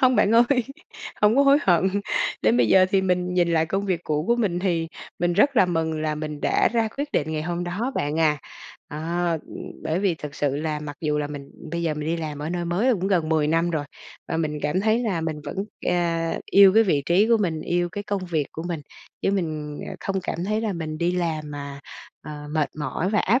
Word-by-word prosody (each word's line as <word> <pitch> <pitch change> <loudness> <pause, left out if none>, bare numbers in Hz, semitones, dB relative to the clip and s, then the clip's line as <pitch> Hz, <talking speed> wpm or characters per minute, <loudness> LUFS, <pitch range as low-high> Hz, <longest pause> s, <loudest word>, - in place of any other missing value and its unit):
Hông 255 -2 +4
bạn 205 - +4
ơi, 240 +1 +4 0.6
hông 210 +3 +5
có 280 - +6
hối 280 +1 +6
hận. 190 +2 +2 0.4
Đến 110 +2 +4
bây 120 -3 +3
giờ 185 -1 +6
thì 195 -1 +3
mình 180 -1 0
nhìn 175 -1 +3
lại 160 -1 +2
công 195 +4 -1
việc 180 -4 0
cũ 150 0 -1
của 235 - +3
mình, 200 -7 0
thì 170 -3 0 0.3
mình 175 0 +1
rất 255 +9 +3
là 190 - +6
mừng 160 -2 -1
là 155 -1 0
mình 150 -1 -5
đã - - +3
ra 230 -2 +2
quyết 290 +1 -3
định 155 +1 0
ngày 155 -1 -2
hôm 175 +1 -2
đó 210 +10 -2
bạn 150 +2 -1
à. 150 -2 +3 0.5
Ờ, 150 - -6 0.5
ừ, - - -13 0.3
bởi 160 +2 -1
vì 190 -3 +1
thực 150 -3 -8
sự 140 -1 0
là 150 0 -2
mặc 145 -1 -7
dù 150 -2 0
là 150 - -1
mình 145 -1 -8 0.2
bây 170 +1 -2
giờ 160 -2 0
mình 150 0 -4
đi 165 - 0
làm 155 -3 -5
ở 150 +2 -4
nơi 175 0 -2
mới 195 +10 +2
cũng 190 -3 -1
gần 175 -5 +1
10 160 -2 +2
năm 165 +2 +2
rồi, 155 -3 -1 0.4
và 165 - -1
mình 155 -2 -1
cảm 180 +5 +1
thấy 220 +2 +2
là 210 -8 -1
mình 160 -2 -3
vẫn, 145 - -6 0.3
à, 170 -2 0
yêu 195 -1 +8
cái 225 - +7
vị 160 -9 +1
trí 190 +6 +4
của 235 - +5
mình, 170 -7 -1
yêu 175 +2 0
cái 205 - -4
công 200 -2 -2
việc 160 -5 -1
của 160 - -6
mình. 170 -2 -3 0.4
Chứ - - +2
mình, 155 -6 -2
ờ, - - -6
không 195 -1 -2
cảm 170 - -3
thấy 215 +2 0
là 220 -2 -1
mình 160 -3 -4
đi 175 +2 +1
làm 160 -4 -2
mà, 140 -1 -7 0.4
à, 150 -1 -8
mệt 150 -3 +1
mỏi 160 +4 -2
và 210 - +2
áp 240 +7 +3
170 Hz, 245 wpm, -24 LUFS, 155-195 Hz, 0.6 s, yêu